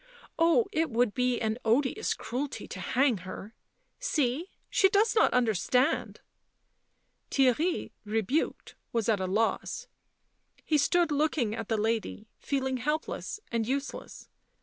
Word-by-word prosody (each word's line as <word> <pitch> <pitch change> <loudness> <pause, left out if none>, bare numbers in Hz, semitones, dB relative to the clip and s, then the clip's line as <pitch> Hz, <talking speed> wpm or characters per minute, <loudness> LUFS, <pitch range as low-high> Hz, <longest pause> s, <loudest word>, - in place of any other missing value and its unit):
Oh, 335 +7 +4
it 325 -4 +1
would 235 -2 +1
be 250 -1 +1
an 220 +1 -1
odious 250 +4 +1
cruelty 265 +4 -4
to - - -7
hang 260 -3 +2
her! 190 +4 -8 0.2
— - - -46
see, 295 +5 0 0.2
she 385 - +4
does 420 +3 +3
not 435 - +4
understand 250 - +1 0.5
!" - - -47
Theirry, 275 +6 +2
rebuked, 225 +7 -1 0.2
was 230 -3 0
at 215 -3 +2
a 185 - -1
loss; 225 - -1 0.8
he 305 -2 +2
stood 340 +2 +2
looking 290 -6 +1
at - - -5
the 225 - +1
lady, 220 0 -2
feeling 265 -2 -1
helpless 300 +9 -3
and 230 -2 0
useless. 275 +2 -4
255 Hz, 135 wpm, -29 LUFS, 225-305 Hz, 0.8 s, Oh